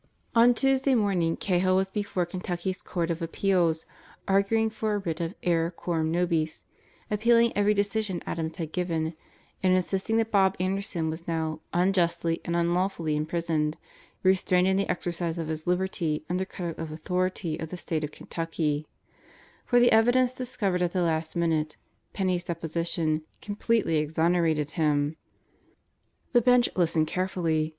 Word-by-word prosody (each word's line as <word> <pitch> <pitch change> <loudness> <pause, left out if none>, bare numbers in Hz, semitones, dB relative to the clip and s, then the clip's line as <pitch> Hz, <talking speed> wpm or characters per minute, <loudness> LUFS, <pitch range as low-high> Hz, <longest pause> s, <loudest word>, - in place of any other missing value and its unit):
On 235 +1 +6
Tuesday 270 +1 +2
morning 185 -7 +1
Cahill 185 0 +2
was 190 0 +1
before 200 -4 -1
Kentucky's 180 +1 -4
Court 170 -2 -2
of 165 +1 -3
Appeals 170 -1 +1 0.4
arguing 210 +3 +2
for 215 -1 -1
a - - +1
writ 170 -4 -3
of 170 +3 -3
error 165 -1 +2
coram 165 -2 -2
nobis, 165 -2 0 0.5
appealing 230 +2 +4
every 205 +1 +3
decision 200 -2 0
Adams 160 -1 -3
had 160 -3 -4
given, 165 -2 -1 0.5
and 185 -1 +4
insisting 195 +4 0
that 225 0 0
Bob 195 -2 +4
Anderson 185 -3 -1
was 165 +2 -7
now 160 -2 -2
"unjustly 170 -2 +1
and 170 - -2
unlawfully 170 -2 0
imprisoned, 155 0 -1 0.5
restrained 185 -1 +3
in 190 - +3
the 195 +1 0
exercise 175 -1 -2
of 165 -2 -3
his 155 0 -4
liberty 175 -4 0
under 185 +1 0
color 175 -2 -5
of 160 -1 -5
authority 180 0 -2
of 160 - -5
the 180 - -6
State 160 -3 -3
of 150 - -2
Kentucky"; 155 -2 -3 0.8
for 245 - +5
the 245 0 +5
evidence 245 +3 +4
discovered 235 -8 -2
at 175 -1 0
the 180 -2 +1
last 160 -1 -1
minute 160 -3 0 0.3
Penney's 185 -3 -1
deposition 165 -1 -1 0.2
completely 210 -4 0
exonerated 160 0 +1
him. 150 -2 +1 1.2
The 240 - +5
Bench 245 0 +4
listened 165 -3 +2
carefully. 165 -3 0
175 Hz, 145 wpm, -27 LUFS, 160-195 Hz, 1.2 s, On